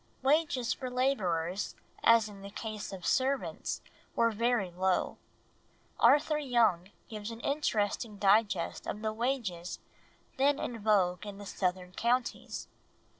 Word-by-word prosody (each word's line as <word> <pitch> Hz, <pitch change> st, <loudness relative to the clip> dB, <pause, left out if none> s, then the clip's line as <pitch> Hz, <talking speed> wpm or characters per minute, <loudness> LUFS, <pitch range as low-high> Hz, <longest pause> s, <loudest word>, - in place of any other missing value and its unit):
Wages 275 Hz, -4 st, +2 dB
for 255 Hz, -2 st, -5 dB
labourers, 195 Hz, -9 st, 0 dB, 0.3 s
as 230 Hz, -2 st, +6 dB
in 200 Hz, -2 st, -11 dB
the 200 Hz, -, -8 dB
case 215 Hz, 0 st, -5 dB
of 190 Hz, -2 st, -7 dB
servants, 265 Hz, +1 st, 0 dB, 0.3 s
were 230 Hz, 0 st, +3 dB
very 225 Hz, -3 st, +1 dB
low. 185 Hz, +1 st, 0 dB, 0.8 s
Arthur 295 Hz, +5 st, +5 dB
Young 230 Hz, -, +2 dB, 0.2 s
gives 215 Hz, -1 st, -6 dB
an 230 Hz, 0 st, -7 dB
interesting 220 Hz, -6 st, -1 dB
digest 200 Hz, -2 st, +2 dB
of 210 Hz, -, -4 dB
the 215 Hz, 0 st, 0 dB
wages 220 Hz, -8 st, -2 dB, 0.6 s
then 280 Hz, +2 st, +3 dB
in 235 Hz, -4 st, -4 dB
vogue 190 Hz, -4 st, +2 dB
in 200 Hz, -1 st, -7 dB
the 205 Hz, -, -9 dB
southern 180 Hz, -2 st, -2 dB
counties. 240 Hz, +5 st, -1 dB
215 Hz, 125 wpm, -31 LUFS, 195-250 Hz, 0.8 s, as